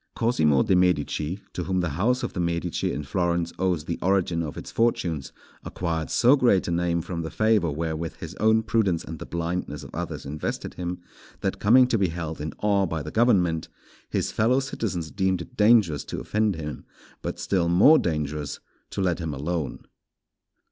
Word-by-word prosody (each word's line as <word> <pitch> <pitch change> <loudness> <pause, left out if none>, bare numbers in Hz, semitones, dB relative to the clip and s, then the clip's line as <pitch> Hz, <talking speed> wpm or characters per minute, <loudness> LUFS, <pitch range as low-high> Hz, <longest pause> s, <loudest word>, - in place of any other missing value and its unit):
Cosimo 75 - +3
de' 95 - +2
Medici, 90 0 +1
to 90 - -3
whom 95 -1 0
the 90 - -1
house 110 - 0
of - - -3
the - - -4
Medici 85 0 -1
in 75 - -3
Florence 85 +2 -1
owes 90 -4 0
the 85 - -3
origin 90 -3 +1
of 75 -3 -5
its - - -7
fortunes, 85 -11 0 0.3
acquired 80 -3 -3
so 125 +4 +5
great 120 -9 +3
a - - -1
name 85 -1 0
from 85 -1 -4
the 80 - -4
favour 110 -4 +2
wherewith 80 +2 -3
his 80 +1 -8
own 110 +1 +4
prudence 105 -7 +1
and 80 -1 -8
the - - -7
blindness 85 -3 -3
of - - -11
others - - -5
invested 75 +2 -4
him, 90 0 -4 0.4
that - - -2
coming 125 +5 +6
to 120 -3 +1
be 95 - +3
held 80 -2 -5
in 75 - -3
awe 100 -2 +3
by 80 -2 -3
the 75 - -6
government, 90 -9 +2 0.4
his - - -1
fellow 120 +5 +3
citizens 100 -11 -3
deemed 95 -2 0
it - - -17
dangerous 105 - +4
to - - -5
offend 105 -2 0
him, 75 -2 -6 0.4
but - - -4
still 90 -3 0
more 100 - +7
dangerous 75 -3 -2 0.3
to - - -3
let 90 -3 +1
him 80 -4 -3
alone. 75 +2 -3
85 Hz, 185 wpm, -25 LUFS, 80-100 Hz, 0.4 s, more